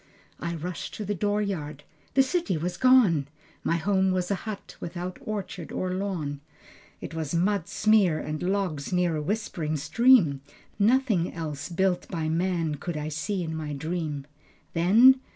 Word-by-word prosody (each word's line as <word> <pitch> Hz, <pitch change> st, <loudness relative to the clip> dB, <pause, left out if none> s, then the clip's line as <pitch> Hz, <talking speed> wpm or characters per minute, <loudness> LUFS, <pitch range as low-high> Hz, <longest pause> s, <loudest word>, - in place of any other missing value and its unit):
I 170 Hz, 0 st, -3 dB
rushed 170 Hz, +2 st, -5 dB
to 215 Hz, -, -5 dB
the 205 Hz, -, -1 dB
door 205 Hz, +2 st, 0 dB
yard. 150 Hz, -7 st, -4 dB, 0.3 s
The 270 Hz, -, +7 dB
city 265 Hz, -, 0 dB
was 175 Hz, +3 st, -2 dB
gone. 225 Hz, -, +5 dB, 0.4 s
My 165 Hz, -, +1 dB
home 190 Hz, +3 st, +2 dB
was 185 Hz, 0 st, -1 dB
a 200 Hz, +3 st, -3 dB
hut 205 Hz, -2 st, -7 dB
without 175 Hz, +1 st, -5 dB
orchard 190 Hz, -6 st, -5 dB
or 185 Hz, 0 st, -2 dB
lawn. 175 Hz, -7 st, -3 dB, 0.6 s
It -, -, -7 dB
was 160 Hz, -1 st, -3 dB
mud 185 Hz, 0 st, +1 dB
smear 210 Hz, -7 st, +3 dB
and 155 Hz, 0 st, -4 dB
logs 180 Hz, -6 st, -1 dB
near 180 Hz, -2 st, +2 dB
a 155 Hz, -, -1 dB
whispering 160 Hz, -4 st, -2 dB
stream, 175 Hz, -, +4 dB, 0.4 s
Nothing 220 Hz, -5 st, +3 dB
else 150 Hz, -3 st, -5 dB
built 180 Hz, 0 st, 0 dB
by 160 Hz, -3 st, -2 dB
man 165 Hz, -2 st, 0 dB
could 170 Hz, -3 st, -3 dB
I 150 Hz, 0 st, -3 dB
see 175 Hz, +5 st, -2 dB
in 160 Hz, -1 st, -4 dB
my 155 Hz, -2 st, -4 dB
dream... 155 Hz, -1 st, -3 dB, 0.5 s
Then 225 Hz, +10 st, +6 dB
175 Hz, 160 wpm, -27 LUFS, 155-200 Hz, 0.6 s, The